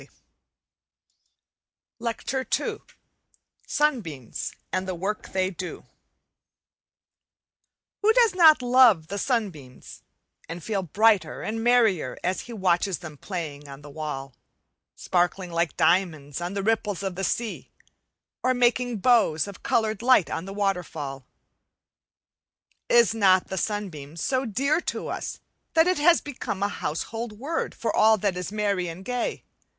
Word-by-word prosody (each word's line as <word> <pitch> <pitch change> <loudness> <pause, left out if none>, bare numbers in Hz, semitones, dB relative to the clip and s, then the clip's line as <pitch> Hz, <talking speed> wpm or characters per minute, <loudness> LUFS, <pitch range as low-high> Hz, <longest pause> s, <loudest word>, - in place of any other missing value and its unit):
Week - - -16
3 - - -32 1.9
Lecture 240 +3 -3
II - - -4 0.9
Sunbeams 200 - -1 0.2
and 185 0 -1
How - - -1
They - - -10
Work 200 +4 -3
Who 185 -1 -3 2.3
does 465 -2 +4
not 320 -7 +6
love 245 -10 +5
the 200 +1 -3
sunbeams, 185 - -4 0.5
and 165 0 -6
feel 205 -3 -1
brighter 205 +4 +2
and 225 +1 -3
merrier 225 - +3
as 185 +1 -1
he 245 - -11
watches 185 -2 +1
them 155 -4 -9
playing 150 -4 -6
on 140 +1 -11
the 145 - -11
wall, 140 -3 -5 0.6
sparkling 180 0 0
like 170 0 -1
diamonds 160 -4 +1
on 175 +3 -4
the 200 - -2
ripples 210 -3 0
of 190 -1 -2
the 190 +2 -5
sea, 230 +3 -2 0.7
or 255 0 +2
making 245 -1 +2
bows 210 -10 +3
of 200 -3 -10
coloured 220 -2 0
light 245 -7 +4
on 165 - -3
the 195 - -7
waterfall? 160 -10 -3 1.6
Is 235 -2 +5
not 190 -4 +3
the 190 - -3
sunbeam 170 -8 -4
so 260 +10 0
dear 275 - +1
to - - -4
us - - -5 0.3
that 320 0 +6
it 365 -3 +1
has 335 +3 +5
become 225 -8 -4
a 200 - +1
household 225 +8 -4
word 280 +10 -3
for 230 - -2
all 220 0 +5
that 200 -2 -1
is 180 +1 -4
merry 200 -4 0
and 170 +3 -8
gay? 250 -1 -2
200 Hz, 135 wpm, -25 LUFS, 170-235 Hz, 2.3 s, not